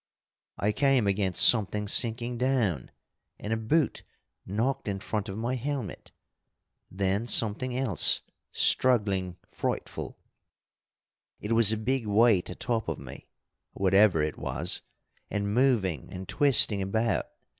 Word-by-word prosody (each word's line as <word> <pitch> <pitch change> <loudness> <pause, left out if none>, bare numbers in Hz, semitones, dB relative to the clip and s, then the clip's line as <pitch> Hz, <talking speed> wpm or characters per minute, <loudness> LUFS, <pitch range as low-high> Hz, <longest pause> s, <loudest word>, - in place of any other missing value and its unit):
I 105 - 0
came 135 -1 +2
against 100 -2 +4
something 105 -2 +2
sinking 120 +3 0
down, 120 - -1 0.5
and 105 +2 -4
a - - -1
boot 135 +7 0 0.5
knocked 115 +8 -2
in 100 -1 -3
front 105 0 -4
of 95 - -6
my 120 +3 -3
helmet. 130 -3 -5 0.8
Then 100 +4 -2
something 120 +3 +1
else, 130 -9 +3 0.3
struggling 100 -8 +1
frightful. - - -5 1.2
It 105 - -6
was 115 -2 +4
a 110 - -1
big 120 +1 -2
weight 105 -2 +3
atop 110 +4 -3
of - - -4
me, - - -11 0.5
whatever 95 -3 +3
it 75 -1 -4
was, - - -1 0.5
and 100 0 -3
moving 110 - 0
and 95 0 -8
twisting 130 -8 +4
about. 110 +3 -1
110 Hz, 125 wpm, -27 LUFS, 100-120 Hz, 1.2 s, against